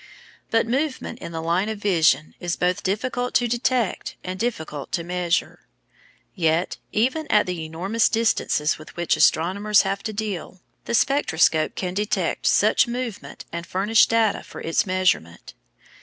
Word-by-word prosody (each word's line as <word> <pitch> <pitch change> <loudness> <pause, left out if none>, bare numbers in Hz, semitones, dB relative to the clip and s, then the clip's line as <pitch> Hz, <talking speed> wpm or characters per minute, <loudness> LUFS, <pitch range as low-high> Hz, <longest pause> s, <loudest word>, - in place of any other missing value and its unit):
But 225 0 +2
movement 260 -1 -2
in - - -7
the 160 -1 -5
line 175 +5 +1
of 220 - -4
vision 160 -7 +2
is 175 -1 -2
both 180 +2 0
difficult 245 +5 -2
to 245 - +3
detect 240 -2 -1
and 185 +1 -5
difficult 160 - -4
to 170 - 0
measure. 175 0 -2 0.7
Yet, 165 -1 0
even 265 +8 0
at 210 - +4
the 180 -3 -4
enormous 190 +8 0
distances 220 -10 +1
with 155 - -13
which 175 -1 +1
astronomers 200 +6 +3
have 195 0 -2
to 220 - -4
deal, 200 -4 -5 0.3
the 235 - -1
spectroscope 165 - +2
can 180 -1 -3
detect 210 +2 -1
such - - +4
movement 240 -3 -6
and 170 0 -6
furnish 205 +4 +3
data 225 -2 +2
for - - -11
its 165 +4 0
measurement. 185 - 0
195 Hz, 150 wpm, -23 LUFS, 170-225 Hz, 0.7 s, at